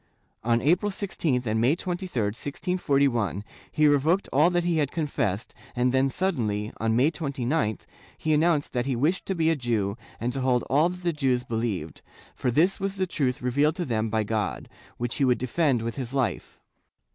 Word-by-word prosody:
On 115 Hz, +1 st, +2 dB
April 175 Hz, +8 st, +3 dB
16th 165 Hz, -10 st, -1 dB
and 110 Hz, 0 st, 0 dB
May 130 Hz, +7 st, +4 dB
23, 180 Hz, +1 st, -4 dB
1641, 135 Hz, -, 0 dB, 0.3 s
he 155 Hz, -, +2 dB
revoked 150 Hz, +7 st, +3 dB
all 150 Hz, +5 st, +5 dB
that 175 Hz, -1 st, +1 dB
he 170 Hz, -1 st, +1 dB
had 145 Hz, -3 st, +1 dB
con 160 Hz, -2 st, -1 dB
fessed 115 Hz, -7 st, -2 dB, 0.2 s
and 125 Hz, 0 st, +2 dB
then 135 Hz, +1 st, +2 dB
suddenly, 115 Hz, -, -1 dB
on 110 Hz, 0 st, 0 dB
May 135 Hz, +7 st, +4 dB
29th, 135 Hz, -, -1 dB, 0.4 s
he 155 Hz, -, 0 dB
announced 155 Hz, -1 st, +2 dB
that 125 Hz, +1 st, -1 dB
he 135 Hz, -, 0 dB
wished 155 Hz, +10 st, 0 dB
to 190 Hz, -, -1 dB
be 165 Hz, -1 st, +2 dB
a -, -, +2 dB
Jew 115 Hz, -7 st, -1 dB, 0.2 s
and 120 Hz, +2 st, -2 dB
to 135 Hz, -, -3 dB
hold 125 Hz, -1 st, +2 dB
all 150 Hz, +5 st, +3 dB
that 180 Hz, 0 st, -8 dB
the 170 Hz, -1 st, +1 dB
Jews 130 Hz, -4 st, +1 dB
believed, 110 Hz, -, -3 dB, 0.3 s
for 125 Hz, -, -1 dB
this 170 Hz, -, +2 dB
was 195 Hz, 0 st, -2 dB
the 190 Hz, -1 st, 0 dB
truth 130 Hz, -8 st, -1 dB
revealed, 145 Hz, +5 st, +2 dB
to 175 Hz, -, -2 dB
them 110 Hz, -3 st, -1 dB
by 110 Hz, 0 st, +1 dB
God, 105 Hz, -1 st, -2 dB, 0.3 s
which 120 Hz, 0 st, -2 dB
he 140 Hz, -, +1 dB
would 125 Hz, -2 st, +3 dB
defend 130 Hz, -1 st, +1 dB
with 115 Hz, +2 st, -4 dB
his 130 Hz, 0 st, -5 dB
life. 130 Hz, -3 st, -2 dB
135 Hz, 190 wpm, -26 LUFS, 120-165 Hz, 0.4 s, all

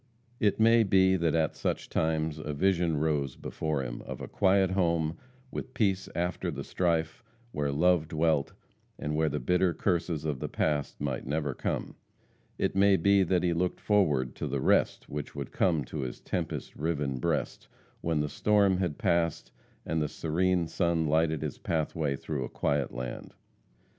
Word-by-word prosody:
It 105 Hz, 0 st, +2 dB
may 115 Hz, +1 st, +6 dB
be 95 Hz, -2 st, +4 dB
that 85 Hz, -4 st, +1 dB
at 80 Hz, -1 st, +1 dB
such -, -, -2 dB
times 80 Hz, -1 st, 0 dB
a 75 Hz, -1 st, -4 dB
vision 85 Hz, -1 st, +2 dB
rose 75 Hz, -4 st, 0 dB
before 75 Hz, -4 st, -3 dB
him, -, -, -5 dB
of -, -, -6 dB
a -, -, -6 dB
quiet 95 Hz, -1 st, +3 dB
home 85 Hz, -4 st, +1 dB, 0.4 s
with 130 Hz, -, -6 dB
peace 100 Hz, -5 st, +1 dB
after 90 Hz, +1 st, -1 dB
the -, -, -4 dB
strife, 80 Hz, -3 st, -1 dB, 0.3 s
where 75 Hz, -5 st, -1 dB
love 85 Hz, +2 st, +3 dB
dwelt, 80 Hz, -3 st, +1 dB, 0.4 s
and 75 Hz, +1 st, -3 dB
where 80 Hz, 0 st, +2 dB
the -, -, -2 dB
bitter 90 Hz, +6 st, +2 dB
curses 85 Hz, -4 st, -1 dB
of 75 Hz, -4 st, -2 dB
the -, -, -4 dB
past 75 Hz, -2 st, -1 dB
might 65 Hz, -3 st, -3 dB
never 75 Hz, -1 st, -1 dB
come; -, -, -3 dB, 0.6 s
it -, -, 0 dB
may 100 Hz, 0 st, +5 dB
be 100 Hz, +3 st, +4 dB
that 90 Hz, -1 st, +2 dB
he 85 Hz, -1 st, +2 dB
looked 90 Hz, +2 st, -1 dB
forward 75 Hz, -, +2 dB
to -, -, -3 dB
the 70 Hz, -, -1 dB
rest -, -, +2 dB
which 75 Hz, 0 st, -6 dB
would -, -, -5 dB
come 80 Hz, -7 st, +1 dB
to 75 Hz, -, -6 dB
his 65 Hz, -3 st, -4 dB
tempest -, -, -4 dB
riven 75 Hz, -4 st, -1 dB
breast, -, -, -2 dB, 0.3 s
when 80 Hz, -2 st, 0 dB
the 75 Hz, -, -1 dB
storm 100 Hz, +2 st, +3 dB
had 90 Hz, -5 st, -1 dB
passed 85 Hz, -2 st, 0 dB, 0.3 s
and 80 Hz, -1 st, 0 dB
the 75 Hz, -, +1 dB
serene 85 Hz, +2 st, 0 dB
sun 85 Hz, -2 st, 0 dB
lighted 80 Hz, 0 st, +1 dB
his -, -, -4 dB
pathway 80 Hz, -3 st, -1 dB
through 70 Hz, -1 st, -4 dB
a -, -, -5 dB
quiet 70 Hz, -2 st, 0 dB
land. 60 Hz, 0 st, -6 dB
80 Hz, 175 wpm, -29 LUFS, 75-90 Hz, 0.6 s, may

